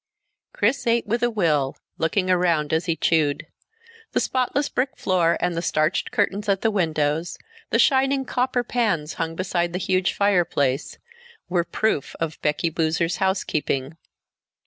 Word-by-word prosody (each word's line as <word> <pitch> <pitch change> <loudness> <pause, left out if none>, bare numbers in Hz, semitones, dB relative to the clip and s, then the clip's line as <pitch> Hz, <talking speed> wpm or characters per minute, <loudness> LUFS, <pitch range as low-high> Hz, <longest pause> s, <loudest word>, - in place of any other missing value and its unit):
Chris 235 +4 0
ate 230 0 +2
with 230 +3 -1
a 240 - +3
will, 155 - 0 0.2
looking 185 +4 +1
around 175 -5 +2
as 160 +1 +1
he 165 -2 0
chewed. 160 -1 +1 0.7
The - - +2
spotless 260 +3 0
brick 265 +3 -2
floor 175 -3 +2
and 180 0 0
the 170 - -2
starched 155 0 0
curtains 205 +1 -1
at 195 -1 +2
the 225 - +2
windows, 160 -3 0 0.3
the - - +2
shining 270 0 +3
copper 250 0 0
pans 210 -11 -1
hung 165 0 -2
beside 175 -1 -1
the - - -1
huge 185 0 +1
fireplace, 175 -9 +1 0.5
were 175 -1 +1
proof 195 -4 -1
of 160 -1 -4
Becky 150 +3 0
Boozer's 165 +1 0
housekeeping. 160 -7 -1
180 Hz, 145 wpm, -23 LUFS, 160-210 Hz, 0.7 s, a